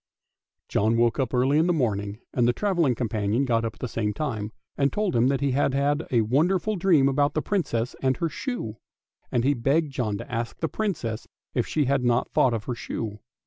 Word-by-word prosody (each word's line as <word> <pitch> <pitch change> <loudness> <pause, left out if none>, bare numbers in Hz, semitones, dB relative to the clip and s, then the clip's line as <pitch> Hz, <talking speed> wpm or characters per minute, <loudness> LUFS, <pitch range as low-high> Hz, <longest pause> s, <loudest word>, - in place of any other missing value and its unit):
John 110 +3 +2
woke 120 +1 +2
up 130 -4 0
early 130 +4 +3
in 165 - +3
the 175 - +3
morning, 105 -6 -1
and 120 -2 +2
the 120 - +3
travelling 170 -6 +1
companion 110 +2 0
got 115 -3 +1
up 115 -1 -3
at - - -23
the 125 - -1
same 105 -2 -2
time, 110 -6 -3 0.2
and 140 -1 +2
told 210 -8 -1
him 120 +2 +4
that 135 0 +1
he 140 -1 +1
had 135 0 +1
had 145 +3 +1
a 120 -3 +3
wonderful 170 - +1
dream 170 -7 +4
about 145 +1 +1
the 155 - +1
Princess 125 - -1
and 130 -1 +1
her 170 - 0
shoe; 155 - -4 0.5
and 120 - +1
he 140 +3 +3
begged 140 +5 +1
John 110 -6 -1
to - - -9
ask 115 0 -3
the 160 - -1
Princess 155 - -3 0.3
if - - 0
she 150 -2 +1
had 135 0 +1
not 120 0 +1
thought 125 -3 +3
of 110 - -4
her 125 - -3
shoe. 110 -2 -5
130 Hz, 220 wpm, -25 LUFS, 115-150 Hz, 0.5 s, him